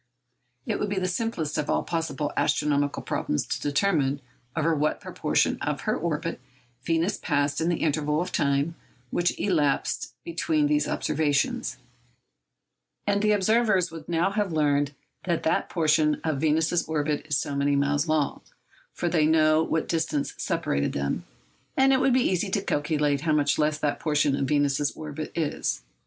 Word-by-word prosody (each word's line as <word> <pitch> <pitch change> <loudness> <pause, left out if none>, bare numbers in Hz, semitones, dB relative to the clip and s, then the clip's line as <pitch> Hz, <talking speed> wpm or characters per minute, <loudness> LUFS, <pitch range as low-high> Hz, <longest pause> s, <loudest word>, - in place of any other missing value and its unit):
It - - -1
would 210 - -1
be 200 - -2
the 185 -1 0
simplest 180 -6 -2
of 150 - -2
all - - +1
possible 165 -3 -2
astronomical 145 -1 +1
problems 75 - -1
to - - -3
determine 145 -2 +1 0.4
over 165 +1 +2
what 150 0 0
proportion - - 0
of - - -2
her - - 0
orbit - - -3 0.4
Venus 165 +7 0
passed 145 -1 0
in 165 - +1
the 175 - -1
interval 150 -1 +1
of 180 +2 -2
time 140 +3 +1 0.4
which 175 0 0
elapsed 145 -8 0
between 160 -2 0
these 150 0 +2
observations; 145 -3 0 1.3
and 200 0 +1
the 210 0 +3
observers 210 -3 +2
would 160 -1 -10
now 175 +3 +1
have 205 -2 -1
learned 145 -2 +1 0.3
that 170 -2 0
that 160 - +1
portion 155 -2 +2
of 155 -4 -1
Venus's 160 +2 +2
orbit 150 -1 -1
is 150 - +1
so 140 - -3
many 140 0 +2
miles 145 +2 +1
long, 155 -3 0 0.5
for 175 - -3
they 160 -3 +3
know 155 0 +4
what 160 -1 -1
distance 160 -3 -1
separated 70 0 -1
them, 70 0 -2 0.5
and 270 0 +5
it 260 - +4
would 265 0 +3
be 255 0 +3
easy 190 +2 0
to 195 +1 0
calculate 145 -3 0
how 155 0 +1
much 145 -1 +2
less 150 0 +2
that 150 -1 -1
portion 150 -3 +2
of 140 - -1
Venus's 145 -1 +1
orbit 155 0 -6
is. 155 - -1
155 Hz, 165 wpm, -26 LUFS, 145-170 Hz, 1.3 s, and